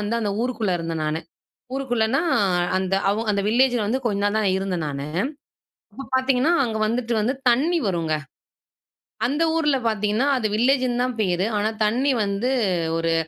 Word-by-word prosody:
வந்து 210 +2 -2
அந்த 210 - -1
ஊருக்குள்ள 235 -6 -1
இருந்தேன் 165 -1 -3
நானு, 155 +1 -1 0.5
ஊருக்குள்ளனா 250 0 0 0.5
அந்த 190 0 0 0.2
அவ 220 +3 -1
அந்த 200 - 0
வில்லேஜில 245 -1 +3
வந்து 250 +5 0
கொஞ்ச 200 -2 0
நாள் 205 +1 +1
தான் 210 -3 +1
இருந்தேன் 185 -4 -2
நானு. 140 0 -4 0.9
அப்போ 275 - -8
பாத்தீங்கன்னா, 260 +4 +2
அங்க 225 -3 -3
வந்துட்டு 235 +1 -1
வந்து 250 +6 0 0.2
தண்ணி 315 +8 +2
வருங்க. 165 -4 0 1.1
அந்த 295 +6 0
ஊர்ல 295 -4 +2
பாத்தீங்கன்னா, 215 +4 0
அது 220 - 0
வில்லேஜுன்னு 250 +1 +2
தான் 250 -2 -2
பேரு. 185 -1 +1
ஆனா, 210 +1 +1 0.2
தண்ணி 255 +6 +1
வந்து 200 +6 -1 0.5
ஒரு 165 0 0
220 Hz, 155 wpm, -23 LUFS, 195-255 Hz, 1.1 s, வில்லேஜில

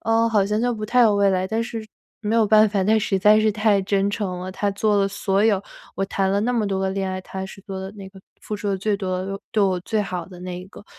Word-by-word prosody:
呃， 225 +1 +3
好 210 -3 +3
像 210 +2 0
就 245 0 +1
不 215 -1 -5
太 250 +4 +2
有 220 -4 +5
未 200 -1 +4
来。 185 0 0
但 225 +1 -1
是 225 -2 -6 0.4
没 220 +1 0
有 220 -2 +4
办 215 0 +6
法， 200 -2 0
他 220 +2 +4
实 195 -2 0
在 210 +2 +5
是 215 - +3
太 210 -2 +2
真 195 +1 +1
诚 195 -4 -3
了。 185 +1 -6
他 200 +1 -1
做 205 +1 +1
了 195 0 +2
所 195 0 0
有 205 -4 +3 0.4
我 195 - 0
谈 195 0 -1
了 200 - +2
那 245 +2 0
么 230 -3 +1
多 190 -1 -1
个 190 0 0
恋 190 -1 -2
爱， 185 0 -4
他 190 0 -6
是 195 +1 -10
做 190 -2 -6
得 190 0 -6
那 195 -1 -9
个 190 0 -15 0.2
付 210 - -5
出 205 0 -4
得 195 - 0
最 205 +1 0
多 185 -1 -3
的、 195 0 -4
对 215 - +1
我 185 -2 +2
最 215 +4 -1
好 180 -4 -3
的 180 -1 -12
那 180 -1 -5
一 - - -10
个。 205 - -14
200 Hz, 310 characters per minute, -22 LUFS, 190-215 Hz, 0.4 s, 办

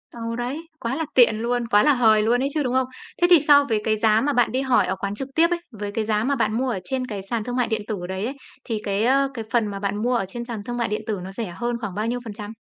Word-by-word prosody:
Ờ, 230 0 -4
đấy, 275 +7 -4
quá 235 +1 -2
là 320 +1 -2
tiện 235 -4 +6
luôn, 240 0 -1
quá 205 -1 +4
là 295 0 +5
hời 220 -4 +4
luôn 240 +3 +2
ấy - - +1
chứ, 305 - 0
đúng 250 -1 -1
không? 260 -1 +2 0.3
Thế 350 - +6
thì 350 - +8
so 290 0 +6
với 215 -2 +1
cái 215 0 +1
giá 220 0 +3
mà 290 +3 0
bạn 245 -4 +2
đi 260 +3 0
hỏi 260 -2 +3
ở 190 - -1
quán 200 +1 -4
trực 265 +5 -2
tiếp 335 +1 +5
ấy, 350 - 0
với 205 -3 -5
cái 215 0 -2
giá 215 0 +1
mà 280 +2 +1
bạn 220 -2 0
mua 260 +1 0
ở 210 -6 -2
trên 255 +5 -2
cái 205 -4 -5
sàn 230 -3 -1
thương 245 +1 -4
mại 250 -2 +1
điện 220 -1 -1
tử 195 -5 -4
đấy 190 +2 -3
ấy, 270 +4 -4 0.3
thì 220 -3 -3
cái, 200 +1 0
ơ, 275 +2 +3
cái 225 -3 -5
phần 230 -3 +2
mà 200 -1 -5
bạn 200 +1 -2
mua 245 +1 +1
ở 230 - 0
trên 235 +5 -6
sàn 230 -4 -6
thương 240 0 -4
mại 235 - 0
điện 210 - -2
tử 210 -3 -2
nó 190 - -7
rẻ 195 -3 -5
hơn 240 0 -1
khoảng 200 -4 -5
bao 210 +2 -1
nhiêu 245 +1 -1
phần 220 - -6
trăm? 210 0 -8
230 Hz, 320 wpm, -23 LUFS, 210-255 Hz, 0.3 s, thì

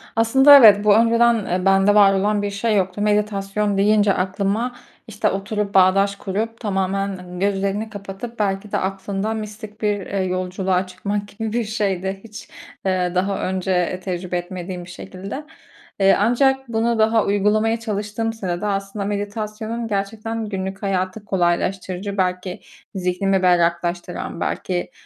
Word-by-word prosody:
Aslında 265 +5 +7
evet, 210 -5 +8
bu 205 -1 +6
öngören, 230 -1 +3
eee, 180 +1 -1
bende 195 +1 +4
var 200 -1 +6
olan 205 +2 +1
bir 205 0 -2
şey 210 +2 0
yoktu. 190 +1 0
Meditasyon 205 -1 0
deyince 205 0 +4
aklıma 200 +6 -1 0.3
işte 210 -2 0
oturup, 200 +1 -3
bağdaş 195 +1 +4
kurup, 215 +4 -4
tamamen 190 -3 -2
gözlerini 200 +2 -1
kapatıp, 205 +3 -8
belki 200 0 -1
de - - +1
aklında 195 +2 -2
mistik 215 0 -8
bir, 205 -1 +1
eee, 195 - -3
yolculuğa 185 0 -1
çıkmak 200 +2 -4
gibi 220 +1 -5
bir 240 -1 +1
şeydi. 195 -3 -2
Hiç, 215 -1 -11 0.4
eee, 180 -1 0
daha 195 +2 0
önce 185 -1 -1
tecrübe 180 -1 -3
etmediğim 180 0 -6
bir - - -13
şekilde. 195 +9 -7 0.6
Eee, 195 0 +5
ancak 265 +4 +2
bunu 230 0 0
daha 220 0 +3
uygulamaya 215 +3 +2
çalıştığım 215 +1 -3
sırada 190 -2 -3
aslında 195 0 -3
meditasyonun 215 +3 -4
gerçekten 220 +2 -3
günlük 190 0 -5
hayatı 190 +2 -2
kolaylaştırıcı, 190 +1 -1
belki 180 0 -2 0.3
zihnimi 190 +1 0
berraklaştıran 175 0 0
belki 180 -1 -2
200 Hz, 135 wpm, -21 LUFS, 190-215 Hz, 0.6 s, evet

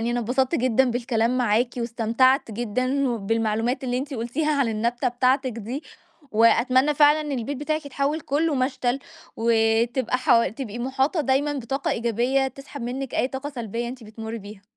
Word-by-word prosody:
يعني 235 +1 -1
أنا 240 0 0
اتبسطت 260 +6 0
جدًا 255 -1 +2
بالكلام 240 0 0
معاكِ 235 0 +2
واستمتعت 235 +2 +2
جدًا 255 +5 -1
وبالمعلومات 225 +3 -1
اللي 250 0 -1
أنتِ 280 +1 -5
قلتيها 255 +7 -1
عن 245 - +2
النبتة 235 +4 0
بتاعتِك 255 +1 +1
دي 235 +6 -5 0.5
وأتمنى 255 +6 +4
فعلًا 295 +1 +5
إن 295 -2 -4
البيت 265 +4 -4
بتاعِك 310 +1 -2
يتحوّل 285 +3 -1
كُلّه 295 +2 0
مشتَل 255 -1 0 0.4
وتبقى 230 +2 +2
حو 230 -2 +4
تبقي 230 +1 -6
مُحاطة 265 +6 0
دايمًا 280 +2 +1
بطاقة 270 0 -2
إيجابية 240 +4 +1
تسحَب 275 0 -10
منِّك 260 +2 -4
أي 255 - +1
طاقة 270 +2 -5
سلبيّة 235 -2 -4
أنتِ 245 -2 -8
بتمرّي 220 +1 -7
بيها. 205 -1 -11
250 Hz, 160 wpm, -24 LUFS, 230-270 Hz, 0.5 s, فعلًا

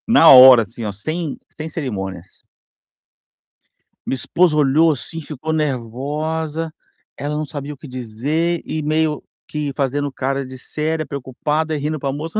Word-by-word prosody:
Na 225 -8 +7
hora, 130 -2 +10
assim, 115 +2 -9
ó, 105 - -2
sem 155 - -4 0.2
sem 160 0 -5
cerimônias. 95 - -6 1.6
Minha - - 0
esposa 165 +5 +2
olhou 150 +3 +4
assim, 160 +3 -6
ficou 155 +1 -5
nervosa, 150 +4 -2 0.4
ela 145 +1 -3
não 155 - -2
sabia 145 0 -6
o - - -14
que 145 - -11
dizer 140 +8 -2
e 155 - -3
meio 155 0 0 0.2
que. 150 -2 -3
fazendo 140 +1 -1
cara 135 +1 -2
de 130 0 -9
séria, 155 +4 -3
preocupada 150 +4 -2
e - - -2
rindo 150 +2 -2
para 135 0 -2
moça. 160 +8 -3
150 Hz, 150 wpm, -20 LUFS, 130-155 Hz, 1.6 s, hora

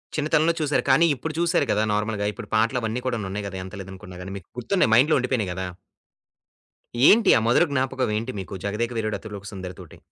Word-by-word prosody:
చిన్నతనంలో 155 +2 +2
చూసారు. 145 -1 +1
కానీ 170 - +5
ఇప్పుడు 155 +4 -5
చూసారు 170 -3 +2
గదా! 105 +1 +2
నార్మల్‌గా 105 -1 -1
ఇప్పుడు - - -9
పాటలవన్నీ 115 +1 0
కూడాను 115 -6 -2
ఉన్నాయి 100 +1 -4
గదా! 95 -1 -6
ఎంత 95 - -11
లేదనుకున్న 95 -1 -10
గాని, 95 +2 -7
మీకు 95 - -13
గుర్తున్నాయి 125 - +1
మైండ్‌లో 140 +7 +5
ఉండిపోయినాయి 125 -7 -1
గదా! 95 +1 -4 1.4
ఏంటి? 225 +2 +6
ఆ - - +3
మధుర 120 - +5
జ్ఞాపకం 130 -3 0
ఏంటి 115 +4 -3
మీకు 95 0 -7
'జగదేక 110 +4 -1
వీరుడు 110 -1 -1
అతిలోక 100 -2 -9
సుందరి'తోటి? 90 -3 -9
110 Hz, 180 wpm, -24 LUFS, 100-130 Hz, 1.4 s, ఏంటి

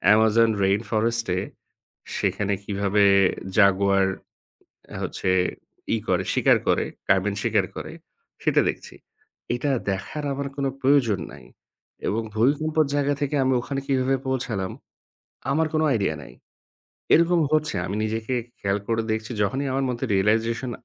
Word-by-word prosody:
Amazon 110 +1 +4
rainforest-এ 105 0 0 0.8
সেখানে 100 -1 0
কিভাবে 100 0 +1 0.5
Jaguar 100 -1 +4 1.0
হচ্ছে, 95 - -2 0.7
ই - - -1
করে - - +1
শিকার - - +4
করে - - +2 0.2
carben 100 +1 +2
শিকার - - +2
করে - - -6 0.5
সেটা - - +3
দেখছি। - - -11 0.6
এটা 135 +4 -1 0.2
দেখার 100 +10 -4
আমার 140 0 -3
কোন 140 - -1
প্রয়োজন 130 -8 +3
নাই, - - -13 0.6
এবং 115 +3 0
ভূমিকম্পের 150 +6 +2
জায়গা 145 0 +1
থেকে 145 0 -1
আমি 130 0 +2
ওখানে 135 +2 -4
কিভাবে 135 0 +1
পৌঁছালাম 110 -7 -2 0.8
আমার 160 +2 +2
কোন 155 - +2 0.2
idea 100 -7 0
নাই। - - -13 0.8
এরকম 170 +1 +4
হচ্ছে 155 0 +1
আমি 100 - -3
নিজেকে 110 +3 -2 0.2
খেয়াল 100 0 0
করে 115 0 +1
দেখছি 110 +2 -3
যখনই 135 +8 -1
আমার 135 +1 0
মধ্যে 125 +2 -3
realization 115 +5 +1
115 Hz, 125 wpm, -24 LUFS, 100-135 Hz, 1.0 s, Amazon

